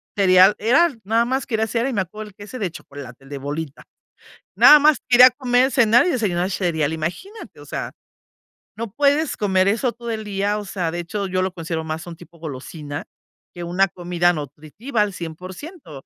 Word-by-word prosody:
Cereal, 190 0 +5
era 275 +8 +3
nada 225 +4 +1
más 260 +2 -1
quería 220 -3 -1
el 220 - -2
cere 235 +4 -1
y 260 - -4
me 200 - +1
acuerdo, 210 +4 -8
el 195 - -22
que 205 - -11
ese 255 +5 -9
de 195 -5 -2
chocolate, 140 -6 -11
el 135 - -16
de 145 - -6
bolita 145 +1 -6 0.7
nada 300 - +9
más. 300 -1 +4
Quería 250 +1 +8
comer, 255 0 +1
cenar 235 +1 +4
y - - +1
desayunar 190 - -1
cereal, 160 -6 -1
imagínate, 175 - -6
o - - -12
sea, - - -5 0.8
no 230 -2 -5
puedes 285 +5 +1
comer 190 -2 +1
eso 230 +5 +1
todo 235 0 -7
el 220 -1 -4
día, 205 0 -1
o 205 - -7
sea, 180 -4 -3
de 175 - -4
hecho 200 +4 -4
yo 185 0 -1
lo 185 0 -1
considero 165 -2 -4
más 160 +1 -5
un 175 -1 -8
tipo 170 0 -17
golosina 145 0 -7 0.5
que 175 - -6
una 180 +3 +1
comida 175 -1 0
nutritiva 155 - -4
al 210 -1 +1
100%. 180 - -9
195 Hz, 200 wpm, -21 LUFS, 165-235 Hz, 0.8 s, nada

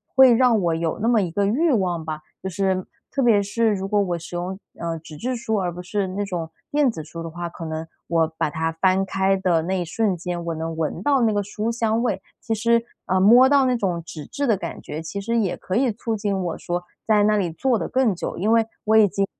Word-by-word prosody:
会 265 -2 +8
让 240 -1 +4
我 175 -5 +1
有 165 0 -2
那 225 - +2
么 230 -3 +4
一 180 -3 -2
个 200 +4 +1
欲 285 +10 +2
望 180 -7 0
吧。 155 -1 -4 0.2
就 190 - -3
是， 190 0 -1 0.2
特 275 - 0
别 225 -5 +4
是 220 +2 +1
如 195 -1 -3
果 205 0 +3
我 180 -3 -1
使 170 +1 -7
用， 180 +2 -4 0.2
呃， 165 -1 -3
纸 155 -1 -11
质 255 +6 -2
书， 230 -2 -2
而 185 -3 0
不 180 - -7
是 200 +1 -1
那 190 +2 -3
种 175 -5 -4 0.2
电 290 -2 +3
子 185 -9 -5
书 165 +2 -8
的 165 - -5
话， 170 +2 -5
可 170 0 -8
能 160 0 -4 0.2
我 165 -1 +2
把 - - +1
它 160 +2 -1
翻 190 +3 +2
开 195 0 +1
的 180 -4 +2
那 185 +2 -1
一 175 - -2
瞬 195 +2 0
间， 175 0 -4
我 170 -1 -3
能 160 +1 -4
闻 160 -1 -2
到 280 -2 +3
那 225 -2 +3
个 205 -1 0
书 210 +3 -3
香 230 -1 0
味， 215 -6 0 0.2
其 225 - -1
实， 230 +1 +2 0.2
呃， 185 - +1
摸 235 +7 +7
到 275 -1 +4
那 255 -1 +2
种 180 -6 -1
纸 155 -3 -8
质 285 0 -3
的 220 -4 +3
感 170 -3 -6
觉， 155 - -6
其 200 +5 -5
实 230 +3 -1
也 205 -5 +1
可 185 - -5
以 250 +1 +3
促 225 +1 -3
进 205 -2 -1
我 175 -2 -3
说 175 0 -3 0.2
在 215 -2 +4
那 210 0 +3
里 180 -5 0
坐 245 +8 +1
得 - - -3
更 255 -6 +2
久。 - - -5
因 210 +5 +1
为 230 -1 +4 0.2
我 220 +1 +4
已 215 -2 +7
经， 195 +1 0
195 Hz, 275 characters per minute, -23 LUFS, 170-225 Hz, 0.2 s, 会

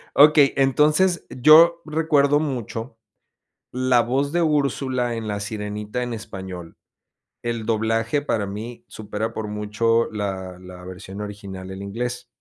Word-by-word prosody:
Okey, 145 -1 +7
entonces, 150 +7 +3
yo 165 +6 +6
recuerdo 150 -2 +2
mucho 120 -5 -4 0.8
la 130 -1 +3
voz 135 +5 0
de 175 +2 +1
Úrsula 135 -5 0
en 115 -1 -5
La 105 -1 -3
Sirenita 105 +2 -4
en 120 -1 -3
español, 95 -5 -8 0.7
el 115 -2 -3
doblaje 115 +5 0
para 105 -8 -1
mí 115 +4 -7
supera 110 +1 -4
por 110 -1 -3
mucho 105 +2 0
la 95 -3 -4
la 90 0 -11
versión 95 +2 -8
original, 100 -2 -7
en 95 +1 -7
inglés. 120 +4 -4
115 Hz, 130 wpm, -23 LUFS, 105-140 Hz, 0.8 s, Okey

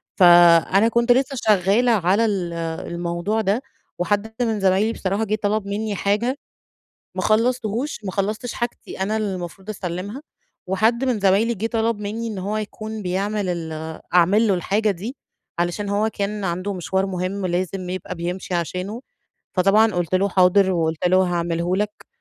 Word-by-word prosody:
فأنا 175 +3 +6
كنت 235 +1 +2
لسّه 265 +2 +2
شغّالة 215 +1 +3
على 200 +1 +3
ال 190 -5 -1 0.4
الموضوع 175 +5 -1
ده، 210 +4 0 0.4
وحد 205 +4 -1
من 225 -3 0
زمايلي 195 +4 +2
بصراحة 195 +3 -1
جه 215 0 0
طلب 205 0 0
مِنّي 205 +1 -2
حاجة. 215 +8 0 0.8
ما - - -2
خلصتهوش 235 +3 0
ما 190 - -3
خلصتش 215 +5 -2
حاجتي 240 -4 -5
أنا 210 +3 0
المفروض 190 -2 -4
أسلمها، 200 - -5 0.4
وحد 220 +7 +1
من 250 -5 0
زمايلي 200 +4 +3
جه 220 +1 -2
طلب 230 -1 0
مِنّي 220 +3 -4
إن 210 -3 -5
هو 200 +3 -2
يكون 215 0 -5
بيعمل 195 +2 -1
ال 160 -2 -5
أعمل 195 +6 +4
له 195 - +3
الحاجة 205 +4 +1
دي 205 +8 -5 0.4
علشان 175 +4 -1
هو 210 +2 +1
كان 205 0 -3
عنده 185 +3 -2
مشوار 190 +2 -1
مهم 185 +1 -3
لازم 180 +1 -2
يبقى 185 0 -5
بيمشي 180 +2 -4
عشانه، 185 +7 -3 0.5
فطبعًا 205 +3 +4
قلت 175 0 -1
له 195 +2 +3
حاضر، 190 +1 +4
وقلت 160 -1 0
له 185 - +4
هاعمله 175 0 -1
لك، 210 +1 -3
200 Hz, 155 wpm, -22 LUFS, 180-220 Hz, 0.8 s, فأنا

